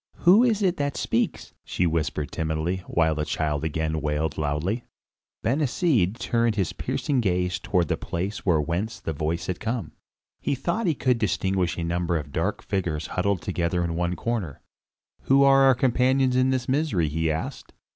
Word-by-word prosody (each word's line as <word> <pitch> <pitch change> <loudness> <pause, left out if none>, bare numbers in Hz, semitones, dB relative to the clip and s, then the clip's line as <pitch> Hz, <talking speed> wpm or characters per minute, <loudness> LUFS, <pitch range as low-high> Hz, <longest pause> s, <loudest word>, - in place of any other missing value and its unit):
"Who 195 +7 +7
is 220 -4 +2
it 180 -2 +2
that 145 -1 -2
speaks?" - - -1
she 90 - -1
whispered 80 -3 -1
timidly, 80 +2 -1
while 80 -1 +2
the 75 0 -2
child 75 -1 -1
again 80 0 -1
wailed 75 +2 -1
loudly. 80 - -1 0.6
Ben 130 +7 +1
Hesed 125 - +1
turned 115 -2 +1
his 95 -5 -1
piercing 135 -4 -1
gaze 90 -3 0
toward 90 -4 0
the - - 0
place 95 +4 -3
from 80 -5 +2
whence 90 +8 -3
the 80 - -4
voice 80 +3 -2
had 90 - -3
come. 115 -6 -3 0.5
He - - -1
thought 175 - -1
he 160 - +2
could 125 -3 +1
distinguish 95 -2 0
a 85 - -2
number 85 0 0
of 75 -2 -6
dark 90 +8 -2
figures 85 -6 -2
huddled 95 -1 0
together 85 0 -1
in 85 -1 -2
one 90 +1 -1
corner. 100 - -3 0.6
"Who 135 +1 +5
are 135 0 +6
our 135 -1 +6
companions 130 +1 +2
in 130 +1 +3
this 130 -1 -1
misery?" 130 - +1
he 80 +2 -1
asked. 80 +1 -4
90 Hz, 175 wpm, -25 LUFS, 80-125 Hz, 0.6 s, Who